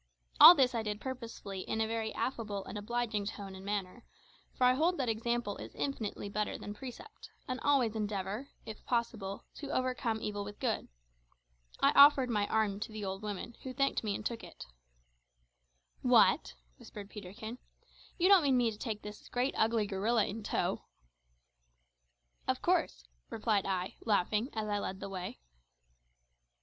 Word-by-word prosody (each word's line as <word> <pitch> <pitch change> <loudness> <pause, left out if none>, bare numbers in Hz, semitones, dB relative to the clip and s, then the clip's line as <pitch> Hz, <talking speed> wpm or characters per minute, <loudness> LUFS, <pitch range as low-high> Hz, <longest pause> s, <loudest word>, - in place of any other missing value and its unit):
All 350 - +12
this 260 -4 +3
I 230 - 0
did 210 -1 -3
purposely 230 -6 -6
in 220 - -3
a 220 - +2
very 220 0 -2
affable 210 -6 -3
and - - -8
obliging 215 -1 -2
tone 200 -2 -6
and 190 0 -10
manner; 200 +2 -3 0.5
for - - -2
I 250 0 +6
hold 335 +7 +2
that 255 -4 0
example 225 -1 -1
is - - -9
infinitely 225 -7 -3
better 210 +1 -2
than 205 - -7
precept, 265 - -10 0.2
and 255 0 -3
always 260 -6 +2
endeavour, 210 +3 -3 0.2
if 220 -1 -8
possible, 225 -5 -2
to 285 - -6
overcome 255 -4 -1
evil 205 -1 -3
with 205 0 -9
good. - - -1 0.9
I - - +6
offered 280 -3 +7
my 205 -2 +1
arm 210 -2 +1
to 225 +2 -5
the 215 -1 -5
old 195 0 -4
woman, 210 +2 -5
who 255 -1 -7
thanked 275 -3 +1
me 205 -2 -1
and 210 - -6
took 235 -1 -3
it. - - -10 1.4
"What!" - - +4 0.2
whispered 205 -2 -10
Peterkin, 220 +4 -8 0.6
"you 355 - +3
don't 395 -2 +8
mean 275 -4 +3
me 240 -2 +2
to 210 - -10
take 220 -4 -4
this 210 0 -9
great 250 +3 0
ugly 225 -1 +2
gorilla 205 +3 +1
in 220 +2 -5
tow?" - - -1 1.7
"Of - - +1
course," - - +1 0.3
replied 210 -3 0
I, 185 -1 -2
laughing, 210 +3 +1
as 220 -1 -2
I 205 -1 0
led 190 -1 -4
the 195 - -6
way. 185 - -6
220 Hz, 165 wpm, -32 LUFS, 205-245 Hz, 1.7 s, All